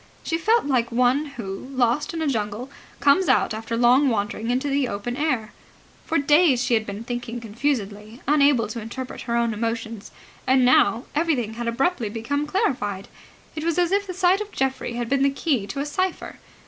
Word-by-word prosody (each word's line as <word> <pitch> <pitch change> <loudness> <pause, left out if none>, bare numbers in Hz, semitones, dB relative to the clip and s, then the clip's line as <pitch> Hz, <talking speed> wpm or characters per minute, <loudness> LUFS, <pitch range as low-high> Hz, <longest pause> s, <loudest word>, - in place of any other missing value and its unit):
She 325 - -1
felt 440 +5 +2
like 245 -4 +1
one 250 +5 +2
who, 195 +1 -6
lost 255 +3 +1
in 330 -2 -3
a - - 0
jungle, 225 +1 -3 0.3
comes 290 +7 +4
out - - +3
after 225 +1 -4
long 250 +4 +5
wandering 215 0 -2
into 255 +3 0
the 280 -2 +1
open 220 +3 -4
air. 255 -7 -1 0.5
For 330 - +1
days 290 -3 +4
she 245 - 0
had 220 -1 +1
been 200 +2 -6
thinking 240 0 -5
confusedly, 220 -2 -3
unable 280 -6 +4
to 230 +1 -5
interpret 255 +4 -7
her 235 - +1
own 235 -1 +1
emotions: 225 -1 -4 0.4
and 260 -1 +4
now 235 -2 +4
everything 290 -9 0
had 235 +1 -5
abruptly 245 - 0
become 285 +7 -2
clarified. 245 - -1 0.5
It 310 - -4
was 335 0 0
as 350 0 +2
if 400 0 +1
the 365 - -5
sight 370 +2 +3
of 420 0 -6
Geoffrey 265 -2 -2
had 240 0 -3
been 270 +2 +1
the 275 - +4
key 275 - -1
to 205 - -5
a - - -2
cipher. 370 +4 -3
250 Hz, 190 wpm, -23 LUFS, 230-290 Hz, 0.5 s, long